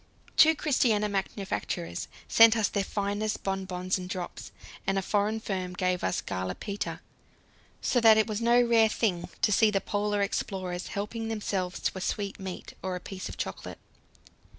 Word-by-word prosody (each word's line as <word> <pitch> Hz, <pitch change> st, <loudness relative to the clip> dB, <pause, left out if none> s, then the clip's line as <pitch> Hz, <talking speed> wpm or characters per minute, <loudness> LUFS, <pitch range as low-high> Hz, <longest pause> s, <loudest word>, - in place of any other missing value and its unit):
Two 320 Hz, 0 st, +7 dB
Christiania 240 Hz, -9 st, +2 dB
manufacturers 190 Hz, -, -3 dB, 0.2 s
sent 225 Hz, 0 st, +7 dB
us 215 Hz, -, +2 dB
their 200 Hz, -, 0 dB
finest 205 Hz, +2 st, -2 dB
bonbons 190 Hz, -1 st, -2 dB
and 180 Hz, 0 st, -7 dB
drops, 180 Hz, -1 st, -6 dB, 0.4 s
and 195 Hz, 0 st, +2 dB
a -, -, +2 dB
foreign 210 Hz, +3 st, +1 dB
firm 185 Hz, -4 st, -3 dB
gave 180 Hz, -1 st, 0 dB
us 95 Hz, -, 0 dB
"Gala 95 Hz, 0 st, -3 dB
Peter," 200 Hz, 0 st, -4 dB, 0.8 s
so 245 Hz, -, +2 dB
that 220 Hz, -1 st, +8 dB
it 220 Hz, -, +4 dB
was 215 Hz, 0 st, -3 dB
no 235 Hz, +1 st, +5 dB
rare 230 Hz, -2 st, +5 dB
thing 190 Hz, -6 st, -1 dB
to -, -, +4 dB
see 215 Hz, +2 st, +5 dB
the 200 Hz, -2 st, +1 dB
Polar 205 Hz, 0 st, 0 dB
explorers 185 Hz, -3 st, -3 dB
helping 225 Hz, +2 st, -4 dB
themselves 200 Hz, -5 st, -2 dB
to -, -, -1 dB
a -, -, -7 dB
sweetmeat 195 Hz, -2 st, -4 dB
or 185 Hz, -1 st, -2 dB
a -, -, -4 dB
piece 185 Hz, +1 st, -7 dB
of -, -, -8 dB
chocolate. -, -, -5 dB
200 Hz, 165 wpm, -28 LUFS, 185-220 Hz, 0.8 s, that